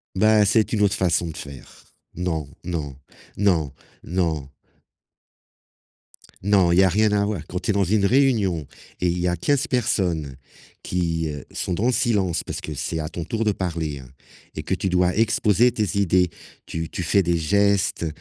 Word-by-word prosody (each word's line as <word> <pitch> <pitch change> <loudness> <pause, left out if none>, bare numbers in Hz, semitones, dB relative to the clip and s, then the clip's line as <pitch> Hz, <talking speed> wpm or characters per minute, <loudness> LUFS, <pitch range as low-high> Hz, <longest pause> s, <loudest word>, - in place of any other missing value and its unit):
Bah, 110 +1 +5
c'est 105 +2 +2
une 105 -2 +1
autre 100 -1 +3
façon 85 -3 +1
de 80 - -9
faire. 70 -4 -11 0.3
Non, 80 -5 -2 0.2
non, 75 -6 -4 0.4
non, 85 -8 +1 0.3
non! 80 -6 -1 1.9
Non, 95 -3 +3
il 85 - +3
y 95 - +7
a - - +5
rien 105 +3 +2
à 100 0 +2
voir, 100 -6 -3
quand 90 - -3
tu 105 - -3
es - - +2
dans 100 - +2
une 100 +2 +2
réunion 110 - +2 0.4
et 90 - +1
il 85 +1 -1
y 90 - 0
a 90 - +1
15 145 - +1
personnes 85 - -1 0.5
qui, 85 -3 -1
heu, 70 -2 -7
sont 90 - -3
dans 105 +7 0
le 125 - +3
silence 100 -8 +1
parce - - -5
que 75 - -6
c'est 80 +4 -3
à 75 - -3
ton 85 0 -6
tour 115 +5 -3
de 110 - +3
parler, 85 -7 -3
heu, 65 - -11 0.5
et - - -5
que - - -1
tu 95 - -2
dois 90 +1 +2
exposer 110 +1 +3
tes 105 -3 -1
idées, 90 -2 +3 0.3
tu 80 0 -5
tu 90 - -4
fais 95 +3 +2
des 85 0 +1
gestes, 100 +1 +1
90 Hz, 190 wpm, -23 LUFS, 80-105 Hz, 1.9 s, y